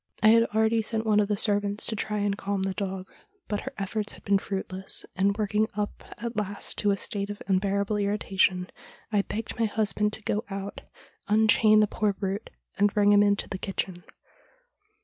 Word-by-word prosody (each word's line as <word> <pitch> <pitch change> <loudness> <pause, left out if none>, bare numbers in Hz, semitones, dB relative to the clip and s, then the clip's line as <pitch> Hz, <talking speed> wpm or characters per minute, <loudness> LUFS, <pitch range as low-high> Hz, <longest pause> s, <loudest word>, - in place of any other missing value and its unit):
I 215 - +8
had 230 +1 +6
already 220 +1 +2
sent 220 +1 -2
one 210 -1 +4
of 205 - +2
the 205 -1 0
servants 205 0 +1
to 220 - +1
try 210 0 -2
and 205 -1 0
calm 200 -1 -2
the 195 0 -1
dog, 190 -1 -4 0.4
but 205 -1 -1
her 265 - -7
efforts 210 +1 -2
had - - -14
been 200 -1 +3
fruitless, 190 -1 -4
and, 200 +2 +2
worked 210 -1 -2 0.2
up 210 0 -3
at 235 +2 -5
last 205 -1 -3
to 205 - +2
a 200 - +2
state 200 +1 -2
of 205 - -6
unbearable 200 +2 +1
irritation, 195 -3 +1 0.4
I 205 -2 +3
begged 225 +3 -5
my 230 - +3
husband 210 0 +1
to 220 - -2
go 210 +2 -1
out, 195 0 -5 0.5
un 220 +1 +4
chain 215 0 +6
the 210 - +3
poor 210 0 0
brute, 195 +2 -4 0.3
and 205 0 +4
bring 205 0 +4
him 205 0 +6
into 205 0 +2
the 190 - -5
kitchen. 185 -2 -3
205 Hz, 195 wpm, -27 LUFS, 195-215 Hz, 0.5 s, I